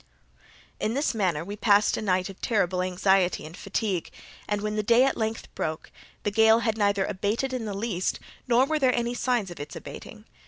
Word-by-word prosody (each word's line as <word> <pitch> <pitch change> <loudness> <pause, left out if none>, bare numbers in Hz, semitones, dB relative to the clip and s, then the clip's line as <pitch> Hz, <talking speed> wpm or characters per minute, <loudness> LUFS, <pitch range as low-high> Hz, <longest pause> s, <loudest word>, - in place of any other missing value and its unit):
In 220 +3 -1
this 285 0 +1
manner 180 -8 0
we 200 +2 -5
passed 205 0 +3
a - - -3
night 185 -3 +1
of 195 - -11
terrible 185 -5 +1
anxiety 185 0 +2
and 160 +2 -10
fatigue, 200 -2 -2 0.4
and, 205 -1 -1
when 210 0 -2
the 215 - +1
day 235 +4 +5
at 270 - +2
length 220 0 -3
broke, 155 0 -4 0.3
the 205 - 0
gale 220 +2 +5
had 225 -2 0
neither 200 -2 +2
abated 220 +8 -1
in 245 -3 -3
the 205 -2 -4
least, 200 -4 -1 0.3
nor 245 +2 +4
were 310 +2 0
there 260 -3 +3
any 240 0 -1
signs 245 -6 0
of 175 - -9
its 145 +1 -7
abating. - - -10
210 Hz, 200 wpm, -26 LUFS, 185-235 Hz, 0.4 s, day